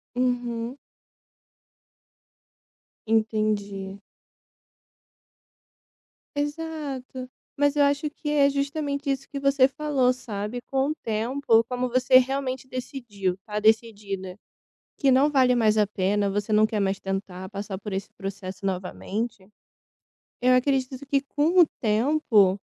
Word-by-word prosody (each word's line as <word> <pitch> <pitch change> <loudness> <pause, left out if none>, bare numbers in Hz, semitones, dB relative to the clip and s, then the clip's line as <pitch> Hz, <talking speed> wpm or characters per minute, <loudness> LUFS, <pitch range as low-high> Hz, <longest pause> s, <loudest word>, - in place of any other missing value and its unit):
Uhum. 245 0 -1 2.3
Entendi. 215 -3 0 2.4
Exato. 290 -4 -4 0.3
Mas 285 0 +2
eu 290 - +4
acho 285 +2 +1
que 295 0 -6
é 285 -2 +4
justamente 280 0 -2
isso 275 0 -2
que 280 - -5
você 275 -1 +4
falou 275 -3 +1
sabe, 225 -1 -5
com 270 +1 +1
o - - -3
tempo, 230 +1 +2
como 250 0 -1
você 255 +1 +5
realmente 260 0 -2
decidiu, 235 -8 -4
tá 210 0 -3
decidida 205 -4 0 0.6
que 275 -2 +3
não 275 +4 +4
vale 260 -3 +4
mais 220 -3 +3
a 210 - +4
pena, 200 +1 0
você 205 +2 -2
não 215 +1 +5
quer 215 -1 -2
mais 195 0 0
tentar 195 -1 -5
passar 200 -1 -5
por 205 +1 -7
esse 190 +1 -3
processo 195 -1 -6
novamente, 195 +2 -4 0.9
eu 255 +1 +5
acredito 260 0 +1
que 275 0 +2
com 295 +6 +1
o 345 - +9 0.2
tempo, 215 -4 +3
245 Hz, 120 wpm, -25 LUFS, 205-275 Hz, 2.4 s, o